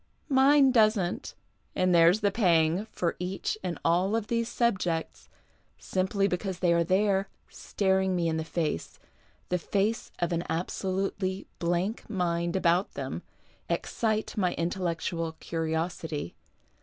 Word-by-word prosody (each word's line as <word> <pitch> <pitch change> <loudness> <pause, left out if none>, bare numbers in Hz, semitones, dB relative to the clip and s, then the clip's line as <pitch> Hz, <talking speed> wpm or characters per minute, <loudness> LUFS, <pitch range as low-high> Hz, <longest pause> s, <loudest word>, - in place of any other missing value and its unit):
Mine 270 0 +5
doesn't 215 -6 +2 0.2
— - - -42
and 185 -1 +2
there's 170 +5 +5
the 205 -1 +2
pang, 175 -2 +2
for 175 -5 -1
each 185 +4 -2
and 180 -2 -3
all 185 +6 +3
these 230 +2 -2
subjects, 190 -10 -1 0.5
simply 195 +1 0
because 185 0 -2
they 175 -1 +2
are 170 0 +3
there, 195 +2 +2 0.2
staring 190 -1 0
me 170 -2 +1
in 160 -1 0
the 160 - -1
face, 155 - -3 0.5
the 180 - +1
face 205 +6 -1
of 175 0 -1
an 170 -1 0
abso 175 +4 -3
lutely 190 0 -1
blank 175 +7 -1
mind 170 -3 -1
about 180 +1 +2
them, - - -4 0.5
excite 220 -1 -1
my 180 -4 0
intellectual 170 -1 -2
curiosity. 160 - -3
185 Hz, 130 wpm, -28 LUFS, 170-200 Hz, 0.5 s, Mine